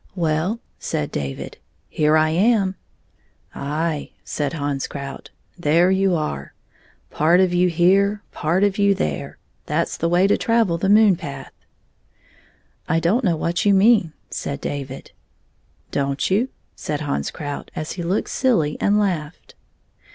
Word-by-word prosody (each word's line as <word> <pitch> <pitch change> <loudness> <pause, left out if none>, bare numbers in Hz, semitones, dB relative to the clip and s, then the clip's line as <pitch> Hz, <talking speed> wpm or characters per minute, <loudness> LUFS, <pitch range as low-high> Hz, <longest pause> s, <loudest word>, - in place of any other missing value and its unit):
" - - -35
Well," 170 +6 0 0.2
said 75 - -3
David, 70 -1 -5 0.2
" 80 - -40
here 150 - +2
I 155 0 +3
am." 195 +2 +2 0.8
"Aye;" 150 +2 -2
said 145 -1 -3
Hans 145 -3 -2
Krout, 140 -1 -7 0.3
"there 170 +3 +3
you 190 -1 +2
are. 110 - -4 0.6
Part 165 +4 +3
of 185 -1 +3
you 180 +1 +3
here, 195 +4 +3
part 170 +6 0
of 205 0 +1
you 200 -1 +4
there. 75 - -3 0.3
That - - 0
's - - -6
the 165 - 0
way 175 +2 +4
to 200 - +2
travel 225 -7 +2
the 195 - 0
moon 210 -3 +6
path." 140 -6 -8 0.7
" - - -31
I 165 +1 +3
don't 200 +10 +1
know 180 -6 +2
what 170 +2 -1
you 200 -1 +4
mean," 195 -5 +4 0.2
said 140 0 -4
David. 135 -2 -6 0.4
" - - -40
Don't 140 +4 -1
you? 225 +7 +2
" - - -41
said 150 -1 -4
Hans 145 -2 -2
Krout, 145 -2 -6
as 155 - -4
he 180 - -5
looked 175 +4 -1
silly 215 - +1
and 205 +1 +3
laughed. 175 -6 -3
170 Hz, 160 wpm, -21 LUFS, 150-195 Hz, 0.8 s, moon